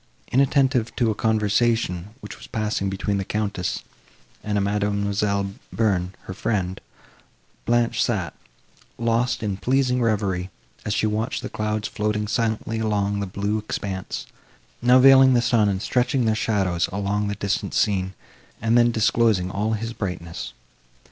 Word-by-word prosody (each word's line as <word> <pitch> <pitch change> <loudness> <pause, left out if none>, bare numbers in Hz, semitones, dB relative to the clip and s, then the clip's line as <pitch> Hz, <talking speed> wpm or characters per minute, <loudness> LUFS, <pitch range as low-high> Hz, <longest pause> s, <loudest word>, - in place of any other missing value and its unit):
Inattentive 135 -2 +2
to 115 -3 +2
a - - 0
conversation, 110 -2 0
which - - -8
was - - -12
passing 105 -3 -1
between 100 +1 -1
the - - -1
Countess 100 -3 -2 0.6
and 105 -1 -1
a - - +2
Mademoiselle 100 0 0 0.2
Bearn, 95 -5 0
her 95 - -7
friend, 95 -3 -2 0.9
Blanche 120 0 +2
sat, 95 -10 -1 0.6
lost 115 +1 0
in 100 -3 -2
pleasing 125 +2 +1
reverie, 100 -5 0 0.4
as 105 - -1
she - - +1
watched 110 +1 -1
the - - -4
clouds 105 0 -2
floating 105 0 -1
silently 110 0 -1
along 100 -2 0
the 100 - -2
blue 100 +3 -1
expanse, 100 -3 -4 0.6
now 125 +1 +6
veiling 135 0 +7
the - - +5
sun 120 -3 +3
and 95 0 -2
stretching 125 0 +1
their 110 - +3
shadows 95 -6 0
along 100 +1 -1
the 100 - -2
distant 100 -1 -2
scene, 95 -2 +1 0.4
and 115 +1 +1
then 120 0 +5
disclosing 110 -4 +2
all 105 +3 -1
his 115 +2 -3
brightness. 90 -6 -5
105 Hz, 145 wpm, -23 LUFS, 100-115 Hz, 0.9 s, veiling